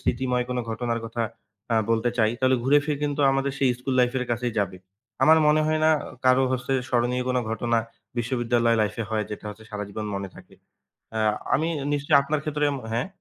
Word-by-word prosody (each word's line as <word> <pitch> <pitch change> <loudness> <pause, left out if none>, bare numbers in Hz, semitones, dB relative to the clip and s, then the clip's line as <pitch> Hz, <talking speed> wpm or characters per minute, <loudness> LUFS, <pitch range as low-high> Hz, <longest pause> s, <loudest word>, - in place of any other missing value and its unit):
স্মৃতিময় 125 0 0
কোনো 125 0 0
ঘটনার 115 +1 -2
কথা 115 +1 -3 0.5
অ্যা 115 -1 +2
বলতে 115 +1 +2
চাই, 110 -1 +4
তাহলে 130 0 +3
ঘুরে-ফিরে 145 +1 +3
কিন্তু 145 0 -1
আমাদের 135 0 0
সেই 135 - +3
ইস্কুল 125 +2 -3
লাইফ 125 0 +2
এর 125 - -2
কাছেই 120 0 -1
যাবে। 95 -2 -1 0.5
আমার 160 +1 +7
মনে 150 +1 +4
হয় 155 0 +1
না, 160 - +6
অ - - -7 0.2
কারো 130 +1 +5
হচ্ছে 125 +1 -2 0.2
স্মরণীয় 125 0 +1
কোনো 125 0 +1
ঘটনা 115 +1 +1 0.4
বিশ্ববিদ্যালয় 120 -1 +1
লাইফ 105 0 -1
এ - - -5
হয়, 110 -1 0
যেটা 105 - -7
হচ্ছে 110 +1 -10
সারা 105 -1 -4
জীবন 105 +1 -5
মনে 100 0 -4
থাকে। - - -15 0.6
অ্যা 110 - -1 0.3
আমি 160 +4 0 0.3
নিশ্চয়ই 145 0 +3
আপনার 150 +2 -1
ক্ষেত্রে 150 -1 -2
এম 140 - -3 0.2
হ্যাঁ? 120 +7 0
125 Hz, 200 wpm, -25 LUFS, 115-140 Hz, 0.6 s, আমার